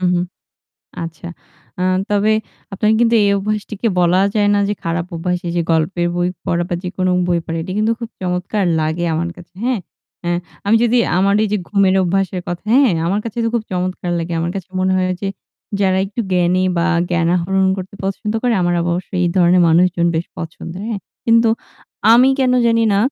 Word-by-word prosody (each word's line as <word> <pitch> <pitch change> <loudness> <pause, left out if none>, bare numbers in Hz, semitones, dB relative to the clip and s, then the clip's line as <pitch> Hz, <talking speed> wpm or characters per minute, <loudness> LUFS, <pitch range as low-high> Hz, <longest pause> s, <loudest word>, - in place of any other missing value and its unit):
উহু। 180 -1 +2 0.8
আচ্ছা। 165 0 -8 0.5
আ - - 0 0.3
তবে 205 +1 +2 0.4
আপনার 210 +2 +1
কিন্তু 235 0 +3
এই 200 - +3
অভ্যাসটিকে 210 +2 -2
বলা 180 +1 +3
যায় 205 -1 +3
না - - +2
যে 205 - 0
খারাপ 170 0 -1
অভ্যাস। 180 +2 -1
এই - - -2
যে - - +3
গল্পের 170 +2 +1
বই 175 0 +1 0.2
পড়া 170 0 0
বা 175 - 0
যেকোনো 185 0 -1 0.2
বই 175 -1 +2
পড়া 165 - -3
এটি 185 - -6
কিন্তু 215 +1 +2
খুব 230 -2 -6
চমৎকার 185 +3 -1
লাগে 160 +2 -1
আমার 170 +2 -1
কাছে, 175 -1 -14
হ্যাঁ। 250 -3 +1 0.4
অ্যা 175 - -1 0.3
আমি 210 +3 +4
যদি 240 +1 +3 0.2
আমার 200 +2 +3
এই - - +1
যে - - +2
ঘুমের 195 -2 +3
অভ্যাসের 185 0 0
কথা 175 0 -4
হ্যাঁ, 270 -4 +5 0.2
আমার 195 +4 +1
কাছে 230 0 -6
তো - - +2
খুব 230 - -1
চমৎকার 180 -1 -2
লাগে। 170 +1 -4
আমার 170 +1 -1
কাছে 190 -2 -6
মনে 185 0 +1
হয় 185 0 +1
যে, 200 - -2 0.5
যারা 190 -1 +2
একটু 200 +4 -7
জ্ঞানী 180 0 +2
বা 170 - +2 0.2
জ্ঞান 170 -2 +1
আহরণ 190 +2 +1
করতে 190 +1 -7
পছন্দ 195 +2 -2
করে 245 -1 +2
আমার 175 0 +1
অবশ্য 175 +1 -2
এই - - +3
ধরনের 180 0 +5
মানুষজন 170 +1 +3
বেশ 165 +2 -1
পছন্দের, 170 +2 -7
হ্যাঁ। 215 -3 -3 0.3
কিন্তু 230 0 +4 0.6
আমি 250 +3 +6
কেন 255 -1 +3
জানিনা 225 -3 +3
185 Hz, 190 wpm, -18 LUFS, 175-205 Hz, 0.8 s, আমি